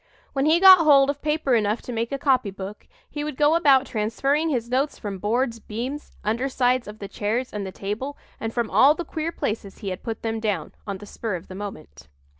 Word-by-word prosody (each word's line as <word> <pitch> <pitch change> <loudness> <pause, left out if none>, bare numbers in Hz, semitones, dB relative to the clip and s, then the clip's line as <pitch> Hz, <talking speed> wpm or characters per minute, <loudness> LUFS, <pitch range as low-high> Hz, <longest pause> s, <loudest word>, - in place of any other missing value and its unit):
When 275 +1 +1
he 325 +2 +5
got 375 -1 +10
hold 285 -3 +5
of 285 - -11
paper 300 -3 0
enough 215 -1 +1
to - - -6
make 230 +1 -2
a 275 - -1
copy 260 -6 +2
book 195 +1 -8 0.2
he 295 - -5
would 300 -3 -5
go 295 +1 +4
about 280 -5 +5
transferring 270 +8 0
his 240 -6 -1
notes 265 +4 0
from 200 -2 -6
boards, 230 +3 0
beams, 245 +8 -6
under 235 +6 0
sides 250 -2 +1
of 210 +1 -8
the 200 - -7
chairs 225 +6 -2
and 205 -2 -4
the - - -6
table, 220 +10 -5 0.2
and 225 - -3
from 235 -1 -2
all 285 +3 +6
the 345 - -5
queer 320 0 -3
places 210 -9 -4
he 200 - -5
had 185 - -5
put 225 -2 -5
them 225 0 -2
down, 205 -8 -2 0.2
on 200 -1 -3
the 205 - -11
spur 215 -1 -4
of 170 - -9
the - - -7
moment. 195 - -8
235 Hz, 225 wpm, -24 LUFS, 210-280 Hz, 0.2 s, got